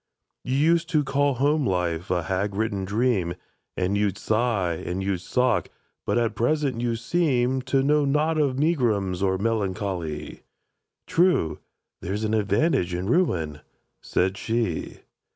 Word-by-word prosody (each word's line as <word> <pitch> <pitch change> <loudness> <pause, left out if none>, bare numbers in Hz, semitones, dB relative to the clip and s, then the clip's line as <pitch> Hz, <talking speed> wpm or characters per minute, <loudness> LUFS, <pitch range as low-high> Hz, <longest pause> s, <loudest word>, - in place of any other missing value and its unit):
—"You 130 - -1
used 165 +3 +3
to 155 -3 +2
call 140 0 +1
home 145 +4 +2
life 90 -5 -1
a 90 -2 0
hag 95 +3 -2
ridden 100 -2 -1
dream, 100 -4 0 0.4
And 95 +2 0
you'd 100 -2 0
sigh, 110 -6 0
and 90 +2 -3
you'd 95 -2 -1
sock; 125 +6 +1 0.4
but - - +1
at 115 -2 +1
present 130 +1 0
you 120 -1 0
seem 130 0 +1
To 135 +1 +1
know 150 +1 +3
not 150 +3 +1
of 135 -4 +1
megrims 115 - +1
or 95 -1 +1
melancho 100 -3 -1
ly!"— 75 -2 -6 0.6
"True. 165 - +2 0.4
There's 100 +5 -3
an 110 0 0
advantage 100 - +1
in 95 +5 -2
ruin," 85 - +1 0.4
said 95 +2 0
she. 115 -8 -2
110 Hz, 145 wpm, -25 LUFS, 95-135 Hz, 0.6 s, used